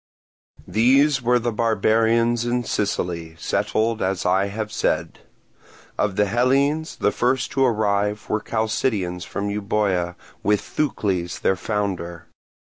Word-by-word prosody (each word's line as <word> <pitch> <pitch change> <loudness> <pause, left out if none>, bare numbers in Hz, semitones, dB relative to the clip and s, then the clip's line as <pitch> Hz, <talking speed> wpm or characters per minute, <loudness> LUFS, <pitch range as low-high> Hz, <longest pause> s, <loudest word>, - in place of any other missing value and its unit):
These 135 +5 +3
were 125 0 +3
the 120 0 -1
barbarians 115 +1 +2
in 120 0 0
Sicily, 85 -7 -2
settled 110 +5 0
as 95 -1 -1
I 95 +2 +2
have 105 +1 -4
said. 105 - -1 0.8
Of 105 -2 0
the 105 0 +3
Hellenes, 135 +8 +1
the 105 - +1
first 125 +1 0
to 135 - +2
arrive 105 -3 +1
were 110 - -1
Chalcidians 105 -5 -1
from 100 +3 -3
Euboea 100 -4 0 0.3
with 105 0 +2
Thucles, 95 - -2
their 95 - +2
founder. 95 -4 -3
105 Hz, 125 wpm, -22 LUFS, 100-120 Hz, 0.8 s, These